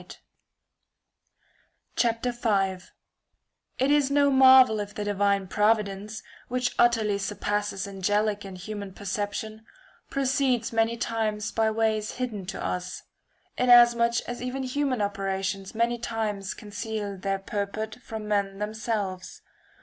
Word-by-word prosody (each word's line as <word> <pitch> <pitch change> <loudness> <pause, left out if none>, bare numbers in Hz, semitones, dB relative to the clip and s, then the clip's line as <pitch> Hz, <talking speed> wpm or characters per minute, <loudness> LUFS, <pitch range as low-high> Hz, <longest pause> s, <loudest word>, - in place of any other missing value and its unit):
] - - -14 2.0
Heaven 230 -5 0 1.0
It 265 +2 +2
is 290 -2 +3
no 285 0 +3
marvel 260 -4 +7
if 205 0 -5
the 210 - -3
divine 200 -1 +1
providence, 210 0 0 0.2
which 250 0 0
and - - -14
earth - - -16
utterly 225 -4 +3
surpasses 205 0 -2
angelic 205 +2 0
and 190 -2 -8
human 200 0 -7
perception, 205 +2 -4 0.5
proceeds 260 -4 0
many 225 +1 +1
times 220 -2 -2
by 220 -1 +2
ways 220 -1 0
hidden 220 -7 -4
to 195 - -5
us; 180 0 -4 0.6
in 250 - +2
[a. - - +10
asmuch 235 -1 +5
as 245 0 -5
even 255 +2 -3
human 255 -3 0
operations 195 0 -3
many 235 +1 +1
times 215 -4 -3
conceal 210 -1 -5
their 195 +1 -2
purport 210 +3 -4
from 220 -2 -7
men 200 -2 0
themselves. 210 -3 -4
215 Hz, 125 wpm, -26 LUFS, 200-235 Hz, 2.0 s, a